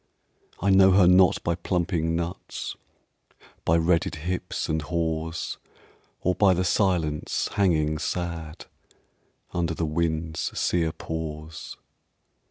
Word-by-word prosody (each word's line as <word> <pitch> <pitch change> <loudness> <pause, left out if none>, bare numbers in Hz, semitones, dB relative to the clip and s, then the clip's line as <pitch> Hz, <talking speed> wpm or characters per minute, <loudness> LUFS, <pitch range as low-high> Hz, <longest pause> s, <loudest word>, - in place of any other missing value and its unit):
I 100 +2 +2
know 95 0 +7
her 95 -1 +6
not 90 +1 +5
by 85 - +1
plumping 85 -2 -1
nuts, 85 +2 -4 0.9
By 85 - +3
redded 85 +1 +2
hips 90 +4 -3
and 80 0 0
haws, 80 0 -2 0.6
Or 90 - +2
by 95 -1 +4
the 90 - +1
silence 85 -5 0
hanging 80 -6 +2
sad 85 -2 -4 0.9
Under 85 -2 -1
the 80 - -1
wind's 80 0 -2
sere 85 -2 +1
pause. 80 0 -6
85 Hz, 110 wpm, -26 LUFS, 80-90 Hz, 0.9 s, know